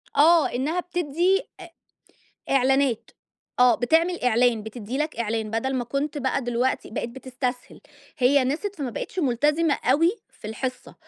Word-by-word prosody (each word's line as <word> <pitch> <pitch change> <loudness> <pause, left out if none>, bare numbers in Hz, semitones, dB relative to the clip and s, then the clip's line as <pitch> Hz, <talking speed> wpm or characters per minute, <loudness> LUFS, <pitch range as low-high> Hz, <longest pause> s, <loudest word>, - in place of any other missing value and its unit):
آه، 325 +1 +6
إنها 300 +8 -1
بتدي 355 +2 0 0.2
أ 350 - -9 0.8
إعلانات، 270 -2 +2 0.5
آه 250 -1 +6
بتعمل 330 +9 +1
إعلان، 245 -2 +3
بتدي 220 +3 -6
لك 305 +1 -2
إعلان 220 -1 -2
بدل 230 +5 -1
ما 250 -2 -1
كنت 280 +4 -3
بقى 270 0 -1
دلوقتي 245 +2 -1
بقِيت 235 - -4
بتستسهِل، 255 0 -5 0.4
هي 265 +1 +4
نسيَت 335 +10 -2
فما 280 -6 -3
بقتش 300 - -6
ملتزِمة 295 +2 +2
أوي 300 +7 +4 0.2
في - - -12
الحصة، 250 +4 -5
265 Hz, 140 wpm, -24 LUFS, 245-305 Hz, 0.8 s, آه